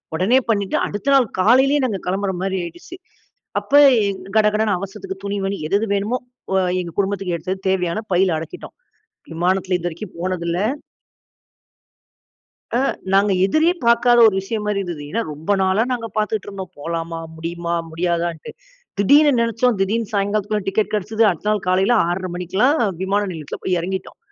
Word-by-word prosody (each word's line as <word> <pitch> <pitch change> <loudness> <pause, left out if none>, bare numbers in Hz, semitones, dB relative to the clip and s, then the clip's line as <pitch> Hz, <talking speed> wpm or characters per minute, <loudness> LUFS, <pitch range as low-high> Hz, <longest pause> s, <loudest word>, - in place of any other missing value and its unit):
உடனே 215 +10 +3
பண்ணிட்டு, 200 -3 +1
அடுத்த 210 +7 -2
நாள் 255 -5 +4
காலையிலேயே 265 +8 +4
நாங்க 205 -6 -2
கிளம்புற 190 +1 -1
மாதிரி 190 0 -1
ஆயிடுச்சு. 175 - -9 0.6
அப்ப 280 - -13 0.3
எங் 190 -1 -4 0.2
கடகடன்னு 210 -2 +2
அவசரத்துக்கு 195 0 -7
துணிமணி 200 -1 -2
எது 200 - +2
எது 225 - -2
வேணுமோ, 210 +6 -1 0.4
வ - - +2 0.3
எங்க 170 -1 -7
குடும்பத்துக்கு 195 -3 -1
எடுத்தது 185 +4 -4
தேவையான 180 +1 0
பைல 180 -2 +3
அடக்கிட்டோம். 160 - -9 0.6
விமானத்தில 180 +2 0
இதுவரைக்கும் 175 +2 -6
போனதில்ல. 175 -1 -2 2.2
அ. - - +2 0.3
நாங்க 200 +1 +4
எதிரே 315 - +3
பார்க்காத 240 +1 +4
ஒரு 200 - +1
விஷயம் 210 +2 -4
மாதிரி 205 -1 0
இருந்தது. 170 -5 -6
ஏன்னா 230 +3 0
ரொம்ப 160 +7 -1
நாளா 190 +4 +2
நாங்க 230 -2 -3
பார்த்துட்டு 215 -1 -1
இருந்தோம். 190 -3 -7
போலாமா? 165 +1 -4 0.2
முடியுமா? 170 +1 -4 0.2
முடியாதான்னுட்டு. 170 -1 -2 0.5
திடீர்னு 290 +8 +6
நினைச்சோம், 230 0 +1
திடீர்னு 215 +3 -1
சாயங்காலத்துக்குள்ள 205 0 -1
டிக்கெட் 210 +2 0
கிடைச்சது. 215 +2 0
அடுத்த 195 +5 -2
நாள் 210 -3 0
காலையில் 190 +6 +3
6:30 180 +1 -2
மணிக்கெல்லாம் 200 - +1 0.2
விமான 200 +2 +1
நிலையத்தில 155 -4 -7
போய் 180 -1 +1
இறங்கிட்டோம். 190 +2 -5
195 Hz, 145 wpm, -20 LUFS, 180-215 Hz, 2.2 s, திடீர்னு